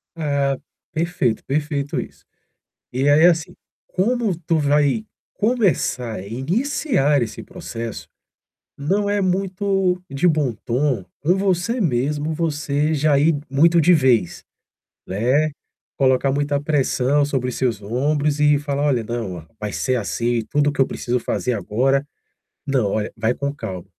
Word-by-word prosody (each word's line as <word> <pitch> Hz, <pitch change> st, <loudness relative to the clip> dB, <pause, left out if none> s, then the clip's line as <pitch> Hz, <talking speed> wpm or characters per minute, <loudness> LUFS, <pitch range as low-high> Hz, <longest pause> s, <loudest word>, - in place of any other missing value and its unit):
Ah, 140 Hz, -4 st, 0 dB, 0.3 s
perfeito, 165 Hz, -8 st, -1 dB
perfeito 145 Hz, 0 st, -1 dB
isso. -, -, -8 dB, 0.7 s
E 130 Hz, +3 st, +1 dB
aí, 145 Hz, +2 st, +5 dB
é 175 Hz, -, +9 dB
assim, 175 Hz, +1 st, 0 dB, 0.3 s
como 225 Hz, 0 st, 0 dB
tu 165 Hz, -, +2 dB
vai 145 Hz, +7 st, +2 dB, 0.3 s
começar, 175 Hz, -, 0 dB
iniciar 150 Hz, -, +1 dB
esse 110 Hz, -, -5 dB
processo, 115 Hz, -2 st, -7 dB, 0.7 s
não 200 Hz, +8 st, 0 dB
é 205 Hz, -, +1 dB
muito 190 Hz, 0 st, 0 dB
de 140 Hz, +6 st, +1 dB
bom 150 Hz, -7 st, +1 dB
tom, 125 Hz, -4 st, 0 dB, 0.2 s
com 175 Hz, +6 st, +3 dB
você 195 Hz, +5 st, 0 dB
mesmo, 150 Hz, +1 st, 0 dB
você 150 Hz, -1 st, 0 dB
já 145 Hz, -1 st, +3 dB
ir 155 Hz, +2 st, +3 dB
muito 165 Hz, +5 st, +4 dB
de 180 Hz, +4 st, +5 dB
vez, 125 Hz, -, +2 dB, 0.6 s
né, 125 Hz, +11 st, +1 dB, 0.5 s
colocar 135 Hz, 0 st, +3 dB
muita 145 Hz, 0 st, 0 dB
pressão 145 Hz, -1 st, +1 dB
sobre 130 Hz, -3 st, -1 dB
seus 115 Hz, -4 st, -1 dB
ombros 145 Hz, +7 st, 0 dB
e 150 Hz, -1 st, +4 dB
falar: 145 Hz, -1 st, -2 dB
"Olha, 125 Hz, -5 st, +1 dB
não, 110 Hz, -5 st, -4 dB
ó, 80 Hz, -, -10 dB
vai 105 Hz, -1 st, -4 dB
ser 130 Hz, -1 st, 0 dB
assim, 120 Hz, +1 st, -1 dB
tudo 145 Hz, 0 st, +2 dB
que 135 Hz, -, 0 dB
eu -, -, +4 dB
preciso 125 Hz, +1 st, -2 dB
fazer 125 Hz, +1 st, -1 dB
agora". 130 Hz, +7 st, +1 dB, 0.6 s
Não. 130 Hz, -7 st, +1 dB
Olha, 110 Hz, 0 st, -1 dB
vai 110 Hz, +2 st, 0 dB
com 140 Hz, +2 st, -3 dB
calma. 95 Hz, -10 st, -6 dB
145 Hz, 140 wpm, -21 LUFS, 125-165 Hz, 0.7 s, é